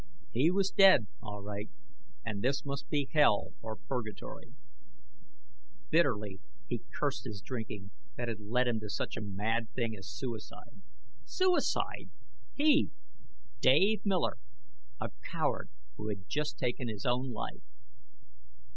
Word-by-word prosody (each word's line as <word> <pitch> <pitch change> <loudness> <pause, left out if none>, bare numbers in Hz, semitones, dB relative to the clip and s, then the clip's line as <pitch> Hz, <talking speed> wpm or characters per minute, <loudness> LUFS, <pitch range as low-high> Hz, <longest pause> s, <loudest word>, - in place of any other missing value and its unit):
He 135 +8 +4
was 195 +1 +2
dead, 190 - +8 0.2
all 105 -1 -6
right; 105 0 -4 0.6
and 105 -3 -2
this 135 +5 +1
must 140 0 -4
be 145 -3 +1
hell 145 -9 +4
or 110 -1 -4
purgatory. 110 -3 -5 1.4
Bitterly 105 -2 +2 0.3
he - - -3
cursed - - -1
his 105 -2 -5
drinking, 105 -3 -5 0.3
that 120 - -2
had 115 -2 -3
led 120 +5 +1
him 115 -2 +1
to 105 -1 -6
such 100 - -2
a - - -4
mad 110 +3 -1
thing 115 -3 0
as 95 -2 -9
suicide. 115 +1 -6 0.4
Suicide! 370 -1 +1 0.5
He 300 0 +5 0.7
Dave 210 +1 +5
Miller 190 - +1 0.6
a - - -2 0.2
coward - - 0 0.3
who 105 - -4
had 100 -3 -4 0.3
taken 125 0 -1
his 105 -3 -5
own 125 +1 +1
life! 110 - -5
115 Hz, 130 wpm, -33 LUFS, 105-140 Hz, 1.4 s, dead